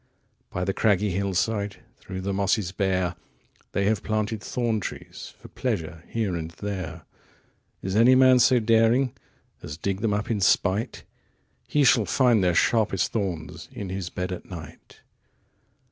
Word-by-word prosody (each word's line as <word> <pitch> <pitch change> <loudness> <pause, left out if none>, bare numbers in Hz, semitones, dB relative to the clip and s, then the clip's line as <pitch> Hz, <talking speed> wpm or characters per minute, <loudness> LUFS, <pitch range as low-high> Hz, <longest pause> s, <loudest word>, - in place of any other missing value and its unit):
40 90 - -4
By - - 0
the 95 - 0
craggy 105 -1 +2
hill 100 +1 -1
side, 100 +2 0 0.2
Through 95 0 -7
the 100 +1 -2
mosses 100 -1 +1
bare, 95 -2 0 0.6
They 100 - +1
have 105 0 +1
planted 110 0 -2
thorn 115 -2 -1
trees - - -8
For - - -13
pleasure 90 -9 -3
here 110 -6 -1
and 80 -1 -4
there. 90 -3 -6 0.8
If 95 +1 -2
any 120 +4 +6
man 130 -1 +6
so 125 0 +5
daring 115 +3 +3 0.5
45 - - -31
As 75 0 -6
dig 95 +3 -2
them 105 -2 +1
up 105 +3 -2
in 105 -3 0
spite, 100 +5 +1 0.6
He 150 - +2
shall 115 -4 +5
find 120 +1 +3
their 90 -2 +2
sharpest 105 -4 +2
thorns 90 -8 -4
In 100 - -6
his 95 -2 -4
bed 90 +1 -4
at 90 - -6
night. 85 -4 -11
100 Hz, 160 wpm, -25 LUFS, 90-110 Hz, 0.8 s, any